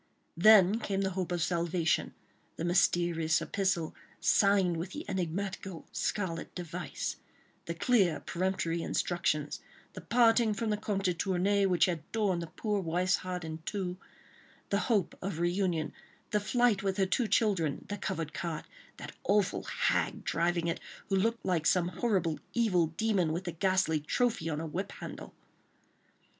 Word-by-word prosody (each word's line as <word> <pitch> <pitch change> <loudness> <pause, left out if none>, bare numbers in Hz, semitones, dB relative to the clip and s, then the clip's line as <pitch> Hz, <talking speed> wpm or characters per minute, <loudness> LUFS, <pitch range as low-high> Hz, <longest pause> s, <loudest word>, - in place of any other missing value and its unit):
Then 205 +2 +7
came 195 -3 -1
the 190 -1 0
hope 180 -1 -3
of 175 -2 0
salvation; 170 -1 0 0.4
the 165 - -3
mysterious 175 -3 +2
epistle, 185 -5 -1 0.3
signed 195 -4 +3
with 180 +3 -5
the 300 - -6
enigmatical 190 0 -3
scarlet 175 -5 -2
device; 175 -1 -4 0.5
the 170 - -4
clear, 185 - +3
peremptory 170 -2 -1 0.2
directions; 155 -4 0 0.3
the - - -8
parting 230 -2 +4
from 220 +1 -1
the 210 - +1
Comte 205 -2 -2
de 180 -2 +2
Tournay, 195 +3 +1
which 180 -2 +4
had 170 -4 -2
torn 205 -6 +1
the 170 - -5
poor 205 +6 -2
wife's 180 +2 +1
heart 180 -1 -5
in 160 0 -5
two; 180 +1 -3 0.8
the 200 - +3
hope 205 -6 +2
of 190 -3 -3
reunion; 175 -3 0 0.4
the 210 - +3
flight 235 0 +2
with 195 -1 -1
her 195 - +3
two 225 +5 +1
children; 190 -8 +1
the 205 - -4
covered 165 -5 -3
cart; 165 -3 -4 0.3
that - - -8
awful 200 0 +2
hag - - 0
driving 170 0 0
it, 170 - -1 0.3
who 195 - +2
looked 225 +4 0
like 170 -5 +1
some 180 -1 +3
horrible 185 -7 0 0.2
evil 190 -8 +3
demon, 200 -7 +2
with 170 +4 -2
the 175 - -3
ghastly 185 -2 +1
trophy 165 +2 0
on 150 - -2
her 160 - -3
whip 185 +5 -4
handle! - - -9
185 Hz, 155 wpm, -31 LUFS, 170-200 Hz, 0.8 s, Then